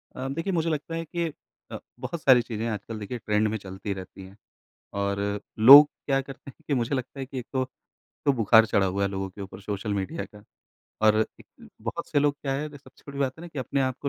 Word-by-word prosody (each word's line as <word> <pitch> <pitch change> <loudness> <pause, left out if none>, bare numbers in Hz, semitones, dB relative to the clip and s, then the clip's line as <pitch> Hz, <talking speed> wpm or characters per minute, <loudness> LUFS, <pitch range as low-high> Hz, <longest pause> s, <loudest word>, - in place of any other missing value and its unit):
अ, 130 +1 -4
देखिए, 165 +6 -2
मुझे 165 -1 +1
लगता 155 +1 -3
है 165 0 -3
कि 170 -2 -3 0.4
अ, - - -4 0.2
बहुत 140 +6 -5
सारी 130 -3 +6
चीज़ें 115 -1 -4
आजकल 110 +1 -5
देखिए 115 +4 -5
ट्रेंड 105 -1 +1
में 110 +1 -2
चलती 95 0 -6
रहती 95 0 -9
हैं। 95 +1 -14 0.7
और 100 0 -1 0.4
लोग 140 +6 +11 0.2
क्या 135 -1 +2
करते 135 0 -10
हैं - - -24
कि 140 - +2
मुझे 120 +2 0
लगता 130 +1 -4
है 135 - -4
कि 135 0 -6
एक 125 - -6
तो, 130 -1 +1 0.6
तो 140 - +4
बुखार 110 +1 +6
चढ़ा 100 -2 +2
हुआ 100 +2 -1
है 100 - +2
लोगों 95 0 -3
के 100 - -13
ऊपर 95 0 -9
सोशल 100 +1 -3
मीडिया 100 - -3
का। 105 -2 -15 0.6
और 110 0 +5 0.2
एक - - -17
बहुत - - -4
से 145 - +2
लोग 145 0 +2
क्या 135 -2 -1
है, 140 +2 -2
ये 145 - -10
सबसे 130 -2 -20
बड़ी 140 - -7
बात 135 -2 +1
है - - -10
ना 175 - -8
कि 150 -4 -6
अपने 135 +2 -1
आपको 130 +2 -2
125 Hz, 240 wpm, -26 LUFS, 105-140 Hz, 0.7 s, लोग